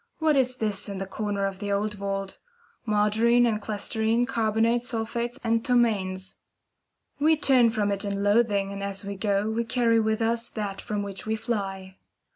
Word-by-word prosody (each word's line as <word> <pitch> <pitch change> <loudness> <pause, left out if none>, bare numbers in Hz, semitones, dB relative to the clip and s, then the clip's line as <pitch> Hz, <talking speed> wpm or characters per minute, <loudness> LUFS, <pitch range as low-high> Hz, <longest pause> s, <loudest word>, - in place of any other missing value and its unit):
What 315 -2 +2
is 255 -2 +2
this 210 -3 -2
in 200 - -5
the 195 - -3
corner 200 0 -2
of 195 -1 -4
the 205 -1 -3
old 210 +1 0
vault? 195 -1 -4 0.5
Margarine 220 +3 +3
and 215 -2 0
chlesterine, 220 +3 0
carbonates, 230 0 +1
sulphates, 235 +2 -3
and 230 -1 +1
ptomaines! 195 -7 0 0.8
We 310 +2 +4
turn 255 -5 +5
from 210 -3 0
it 200 0 -1
in 200 -1 -2
loathing, 205 -2 +2
and 200 0 -6
as 200 0 -4
we 200 0 -4
go 200 +1 0
we 230 +1 0
carry 230 -1 +2
with 220 0 +1
us 230 +1 0
that 205 -3 -4
from 205 -1 -3
which 200 +1 -7
we 220 - +1
fly. 195 -4 -4
215 Hz, 175 wpm, -26 LUFS, 200-230 Hz, 0.8 s, turn